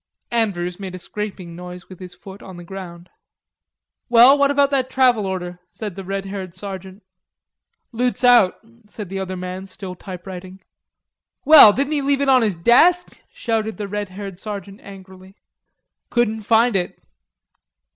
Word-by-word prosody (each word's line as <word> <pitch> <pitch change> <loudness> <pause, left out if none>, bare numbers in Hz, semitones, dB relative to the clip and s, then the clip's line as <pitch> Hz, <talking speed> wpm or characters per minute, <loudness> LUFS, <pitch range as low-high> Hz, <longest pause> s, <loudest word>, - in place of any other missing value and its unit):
Andrews 185 -6 -1
made 190 -2 -7
a - - -6
scraping 190 -3 -7
noise 180 0 -10
with 185 - -13
his 180 -1 -10
foot 190 +2 -12
on 185 -2 -11
the 175 - -10
ground. 175 -1 -9 1.0
"Well, 240 +3 +7
what 280 -1 +2
about 285 0 +2
that 260 -2 0
travel 250 -6 +2
order?" 180 -2 -5
said 210 -5 -7
the 195 - -7
red 195 +1 -4
haired 190 -3 -7
sergeant. 190 +1 -9 0.9
"Loot's 245 +2 -2
out," 240 -7 +5 0.3
said 210 -2 -9
the 195 0 -4
other 190 -1 -5
man, 185 +1 -6
still 185 0 -8
typewriting. 185 +1 -10 0.8
"Well, 290 -7 +10
didn't 275 +7 -2
he 290 - 0
leave 280 0 +1
it 280 - +1
on 260 -1 +5
his 210 -5 0
desk?" 325 - +3
shouted 220 -2 -3
the 210 -1 -5
red 205 0 -4
haired 195 -1 -8
sergeant 200 -1 -8
angrily. 190 -1 -14 0.7
"Couldn't 220 -3 -1
find 230 0 +3
it." 180 -2 -2
195 Hz, 155 wpm, -20 LUFS, 185-235 Hz, 1.0 s, Well